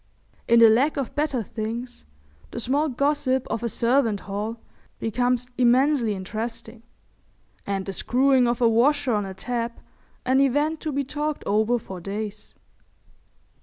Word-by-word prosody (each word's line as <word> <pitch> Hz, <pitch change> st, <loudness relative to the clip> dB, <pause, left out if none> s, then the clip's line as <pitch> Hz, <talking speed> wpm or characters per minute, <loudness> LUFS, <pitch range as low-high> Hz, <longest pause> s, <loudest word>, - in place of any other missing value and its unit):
In 235 Hz, -, +5 dB
the 230 Hz, -1 st, +8 dB
lack 270 Hz, +8 st, +2 dB
of 270 Hz, -4 st, -3 dB
better 290 Hz, -6 st, -1 dB
things 230 Hz, -, -6 dB, 0.4 s
the -, -, -6 dB
small 280 Hz, +6 st, 0 dB
gossip 280 Hz, -1 st, 0 dB
of 225 Hz, -, -2 dB
a 235 Hz, -, -1 dB
servant'' 235 Hz, -3 st, +1 dB
hall 210 Hz, +3 st, -4 dB, 0.4 s
becomes 245 Hz, +2 st, 0 dB
immensely 250 Hz, -2 st, +3 dB
interesting, 225 Hz, +4 st, -6 dB, 0.9 s
and 195 Hz, -1 st, -2 dB
the 195 Hz, -, -5 dB
screwing 255 Hz, +4 st, +3 dB
of 240 Hz, 0 st, -1 dB
a 235 Hz, -, +5 dB
washer 255 Hz, +3 st, +3 dB
on 205 Hz, -2 st, 0 dB
a 190 Hz, -, -8 dB
tap 235 Hz, +3 st, -3 dB, 0.5 s
an 260 Hz, +1 st, +3 dB
event 290 Hz, +4 st, +2 dB
to 310 Hz, -, -3 dB
be 280 Hz, 0 st, -1 dB
talked 295 Hz, +2 st, -3 dB
over 220 Hz, +4 st, +2 dB
for 190 Hz, -5 st, -8 dB
days. 210 Hz, +2 st, -6 dB
240 Hz, 145 wpm, -24 LUFS, 220-270 Hz, 0.9 s, the